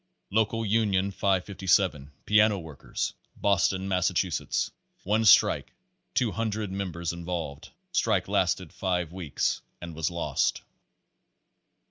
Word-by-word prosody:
Local 110 +2 +1
Union 100 -2 +2
557, 95 -5 +1
Piano 105 0 +4
Workers, 80 -5 -4 0.2
Boston, 95 -1 +1
Massa 90 -2 +1
chusetts. - - 0 0.3
One 110 +3 +1
strike; 105 - +5 0.4
200 110 -3 -1
members 85 -4 -3
involved. 85 -4 -5 0.2
Strike - - +1
lasted - - 0
five 90 -3 -1
weeks 85 -6 -1 0.2
and 85 -1 -7
was 80 -1 -1
lost. 85 -1 -1
95 Hz, 100 wpm, -27 LUFS, 85-105 Hz, 0.4 s, strike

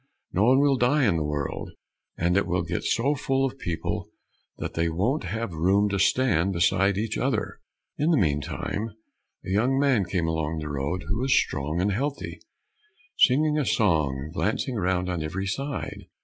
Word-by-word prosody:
No 100 +4 +3
one 130 +3 +5
will 140 -2 +3
die 130 +3 +3
in 90 -5 +2
the 80 - 0
world, 75 -2 -3 0.5
and 85 +1 +1
it 100 - +2
will 90 0 0
get 85 - -3
so 135 +6 +1
full 135 -1 0
of 135 0 -4
people 85 -8 -3 0.5
that - - -5
they 85 +1 0
won't 105 - 0
have 115 -5 -3
room 95 +6 +2
to 100 -1 -1
stand 95 -6 +2
beside 95 +3 +2
each 110 +1 -2
other." 125 -4 -1 0.4
In 150 +3 +2
the 165 - +4
meantime 95 - -1 0.5
a - - -4
young 120 +7 +2
man 135 -8 +3
came 90 -1 -1
along 80 -1 -1
the 75 -1 -4
road, 70 +6 -2
who 100 +5 -1
was 130 +1 0
strong 75 +5 -1
and 100 +3 +1
healthy, 140 +8 -3 0.8
singing 150 +4 +4
a - - +1
song, 80 - +2
and 80 +2 -9
glancing 110 +7 -1
around 90 -3 0
on 90 -3 -2
every 90 +5 -3
side. 135 +8 -4
100 Hz, 180 wpm, -26 LUFS, 85-130 Hz, 0.8 s, one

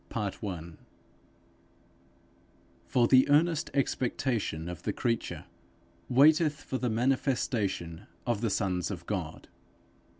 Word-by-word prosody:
_ 95 -6 -4 2.1
For 120 -2 +3
the 130 +2 +5
earnest 160 +2 +3
expectation 120 - -1
of 90 -1 -6
the - - -1
creature 115 -2 -2 0.6
waiteth 150 +3 +4
for 130 - -3
the 125 - 0
manifestation 110 - -1 0.2
of 120 -4 0
the 115 - +1
sons 95 -3 -1
of - - -6
God. - - -4
120 Hz, 100 wpm, -29 LUFS, 95-135 Hz, 2.1 s, the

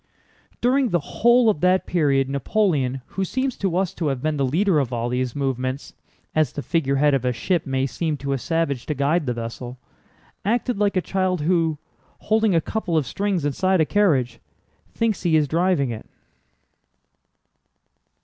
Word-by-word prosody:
During 255 +1 +2
the 175 - +1
whole 240 - +3
of 205 -9 +2
that 185 +1 +3
period 140 -6 +1
Napoleon, 140 - 0
who 195 - -4
seems 260 +6 -2
to 185 -3 -1
us 190 -2 0
to 165 - -3
have 135 -3 -1
been 155 +2 -1
the 140 - 0
leader 170 +4 +2
of 130 -3 -1
all 120 0 -2
these 125 0 -2
movements—as 135 +2 -3
the 145 - -5
figurehead 145 -3 +1
of 135 -3 +1
a 125 - +1
ship 155 +9 -1
may 135 0 0
seem 155 +4 -2
to 140 0 -3
a 135 - -2
savage 165 -5 -1
to 150 - -1
guide 145 +3 +1
the 125 - 0
vessel—acted 125 - -5
like 205 -2 +1
a - - +3
child 185 -2 -1
who, 165 -1 +1 0.4
holding 220 -3 +1
a 165 - +3
couple 180 -3 -2
of 150 - +1
strings 195 -1 -1
inside 185 +6 +1
a 160 - +4
carriage, 135 - +1 0.5
thinks 225 -4 -1
he 170 -3 +2
is 150 -2 +3
driving 165 -4 +1
it. 110 - -8
155 Hz, 170 wpm, -22 LUFS, 135-190 Hz, 0.5 s, a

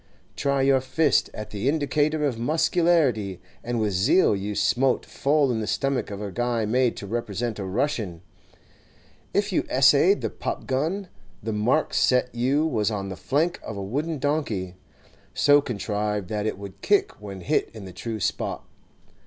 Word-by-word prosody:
Try 140 -1 +1
your 135 -1 +4
fist 150 +4 +2
at 105 - -8
the 105 +5 -1
indicator 150 +1 +1
of 125 -5 -1
muscularity, 145 - +2 0.2
and 120 0 -2
with 105 -2 0
zeal 120 - +4
you 100 +1 -4
smote 130 +4 +2
full 140 -1 +1
in 115 - -1
the 110 - -3
stomach 135 -1 -1
of 100 -1 -6
a 105 -1 -5
guy 120 0 0
made 125 +2 +1
to - - -6
represent 115 +1 -3
a 100 - -3
Russian. 105 - -2 1.1
If - - 0
you - - +2
essayed - - +5
the - - -2
pop - - -4
gun, 160 +9 -1 0.4
the 110 0 -2
mark 120 +9 +1
set 125 -1 +2
you 130 +6 +1
was 110 -9 +1
on 100 -3 -3
the 95 - -5
flank 155 - 0
of 105 - -7
a 100 - -4
wooden 150 +10 -2
donkey, 130 - -1 0.6
so 145 0 +5
contrived 105 -5 -2
that 105 0 -1
it 110 - -2
would 100 -1 -10
kick 205 - +1
when 100 -2 -8
hit 85 - 0
in 110 -3 -10
the 95 - -9
true 110 +4 -5
spot. - - -2
120 Hz, 170 wpm, -25 LUFS, 105-145 Hz, 1.1 s, essayed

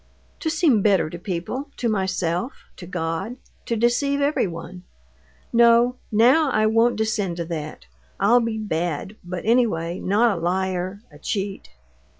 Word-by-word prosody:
"To 320 - -1
seem 310 - +3
better 190 -6 +2
to 170 - -7
people, 190 - -4
to 240 - -1
myself, 190 0 -1 0.2
to 175 - -9
God; 175 +5 -3 0.3
to 235 - 0
deceive 240 +5 +1
everyone. 185 - -2 0.7
No! 235 +1 +5
now 255 +8 +5
I 215 -4 +2
won't 225 +2 +3
descend 215 -5 -1
to 170 - -3
that. 155 - -6 0.3
I'll 225 +5 +5
be 230 -1 -2
bad; 175 -2 -3
but 175 0 -6
anyway 210 -8 +1
not 210 +3 +2
a 170 - -5
liar, 185 +2 -1
a - - -15
cheat." 195 -1 -4
205 Hz, 145 wpm, -23 LUFS, 175-235 Hz, 0.7 s, No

